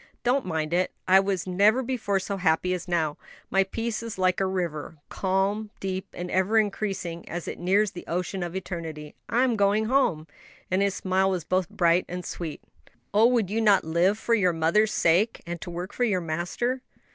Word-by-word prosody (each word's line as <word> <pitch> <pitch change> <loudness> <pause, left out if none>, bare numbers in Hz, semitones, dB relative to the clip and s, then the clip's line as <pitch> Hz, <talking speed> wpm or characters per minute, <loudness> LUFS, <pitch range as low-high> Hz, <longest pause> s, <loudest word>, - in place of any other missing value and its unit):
"Don't 255 -2 +1
mind 160 -2 -2
it, 180 +1 +2 0.2
I 190 +1 +7
was 195 -2 -1
never 205 +7 +3
before 230 -6 -1
so 195 +1 -4
happy 180 0 +1
as 180 0 -4
now; 160 -4 0 0.3
my 195 0 +4
peace 225 +3 -3
is 230 -3 -6
like 185 -1 +2
a 195 - +1
river 170 -5 -3
calm, 195 +3 0
deep, 190 0 -3
and 180 0 -6
ever 190 +4 +2
increasing 195 -5 -1
as 175 0 -5
it - - -5
nears 195 +3 +2
the 175 - -10
ocean 180 +2 -2
of 175 0 -4
eternity. 165 -5 -6 0.2
I'm 240 +2 +2
going 205 +1 +2
home!" 220 - +2 0.5
And 185 +1 +2
his 200 -1 +1
smile 190 0 +1
was 185 -3 -1
both 185 +1 0
bright 175 0 +2
and 180 0 -5
sweet. 165 -3 -6 0.5
"Oh, 215 +3 +6
would 230 -6 +1
you 225 +2 0
not 205 -3 +5
live 170 +6 +2
for 230 - 0
your 185 -6 +3
mother's 170 +7 +2
sake? 180 +7 +2
and 170 -1 -5
to - - -6
work 175 +2 -6
for 245 - -1
your 205 -6 +2
Master?" 175 +10 -2
190 Hz, 195 wpm, -26 LUFS, 175-210 Hz, 0.5 s, I